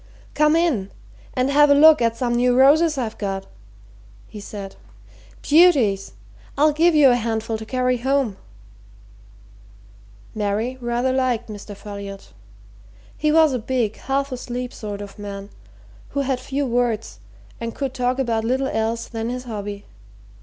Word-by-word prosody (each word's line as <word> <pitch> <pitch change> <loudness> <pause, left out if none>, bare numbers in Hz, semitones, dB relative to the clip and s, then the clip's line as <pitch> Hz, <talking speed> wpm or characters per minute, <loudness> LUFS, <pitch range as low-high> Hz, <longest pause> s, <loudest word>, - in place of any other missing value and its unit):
"Come 300 +1 +3
in 295 - +1 0.5
and 255 +1 +1
have 295 +1 +5
a 285 - +6
look 310 -1 +7
at 230 -1 +1
some 240 -1 -1
new 245 +1 +2
roses 305 +3 +5
I've 230 -4 -4
got," 195 -2 -3 0.8
he 210 - -10
said. 200 -1 -8 0.7
"Beauties! 275 - +4 0.4
I'll 300 +2 +4
give 330 +2 +3
you 285 -4 +7
a - - +4
handful 225 -1 -2
to 220 - -9
carry 255 0 0
home." 260 -4 0 2.0
Mary 215 +4 -2
rather 240 +2 0
liked 250 -3 0
Mr. 205 0 -9
Folliot. 200 -1 -9 0.8
He 305 0 +1
was 315 -2 +5
a 250 - -1
big, 230 -2 -1
half 275 +1 -2
asleep 250 0 -5
sort 205 -2 -6
of 200 0 -10
man, 200 0 -7 0.6
who 280 - -2
had 265 -2 -1
few 275 +2 -2
words 235 -3 -1 0.4
and 230 -1 -5
could 270 -2 -3
talk 250 0 -1
about 230 -4 0
little 260 +4 0
else 225 0 -2
than 225 0 -4
his 250 +1 -4
hobby. 205 -3 -6
245 Hz, 145 wpm, -22 LUFS, 215-275 Hz, 2.0 s, look